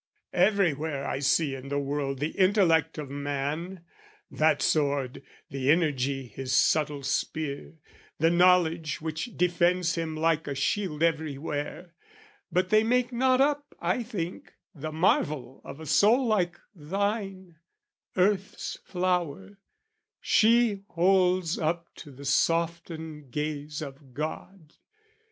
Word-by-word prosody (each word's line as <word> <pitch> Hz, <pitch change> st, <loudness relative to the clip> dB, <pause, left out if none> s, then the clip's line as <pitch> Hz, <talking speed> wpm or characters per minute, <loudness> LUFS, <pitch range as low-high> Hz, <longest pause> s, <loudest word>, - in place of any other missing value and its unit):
Everywhere 160 Hz, -7 st, +1 dB
I -, -, -2 dB
see 145 Hz, +1 st, +2 dB
in 135 Hz, 0 st, -7 dB
the 140 Hz, -, -1 dB
world 140 Hz, -1 st, -2 dB
the 150 Hz, +4 st, -1 dB
intellect 180 Hz, -6 st, +3 dB
of 145 Hz, -3 st, -6 dB
man, 145 Hz, +6 st, -4 dB, 0.5 s
That 155 Hz, +1 st, +2 dB
sword, 140 Hz, -4 st, 0 dB, 0.3 s
the 135 Hz, -1 st, -1 dB
energy 140 Hz, -4 st, +1 dB
his 130 Hz, +3 st, -5 dB
subtle 150 Hz, -2 st, +2 dB
spear, 145 Hz, +2 st, -3 dB, 0.4 s
The 165 Hz, +2 st, +3 dB
knowledge 170 Hz, -3 st, +3 dB
which 160 Hz, +9 st, -5 dB
defends 175 Hz, 0 st, +2 dB
him 165 Hz, -2 st, -3 dB
like 160 Hz, 0 st, +1 dB
a 140 Hz, -, -3 dB
shield 160 Hz, +3 st, -1 dB
Everywhere; 160 Hz, +1 st, -2 dB, 0.6 s
but 180 Hz, +2 st, +1 dB
they 215 Hz, +2 st, +5 dB
make 245 Hz, +2 st, +1 dB
not 255 Hz, +2 st, +3 dB
up, 290 Hz, +1 st, 0 dB
I 180 Hz, +8 st, 0 dB
think, 195 Hz, -7 st, -6 dB, 0.2 s
The 155 Hz, -1 st, -6 dB
marvel 150 Hz, -6 st, 0 dB
of 140 Hz, -, -9 dB
a 160 Hz, -, -8 dB
soul 230 Hz, -, +4 dB
like 195 Hz, -6 st, 0 dB
thine, 195 Hz, +1 st, -3 dB, 0.6 s
earth's 195 Hz, +1 st, 0 dB
flower 185 Hz, +1 st, -2 dB, 0.6 s
She 225 Hz, -2 st, +3 dB
holds 180 Hz, -1 st, +2 dB
up 170 Hz, +1 st, -2 dB
to 150 Hz, -, -10 dB
the 140 Hz, +1 st, -11 dB
softened 160 Hz, -1 st, -1 dB
gaze 150 Hz, +2 st, -4 dB
of 135 Hz, -2 st, -11 dB
God! 155 Hz, +2 st, -6 dB
165 Hz, 120 wpm, -27 LUFS, 145-185 Hz, 0.6 s, they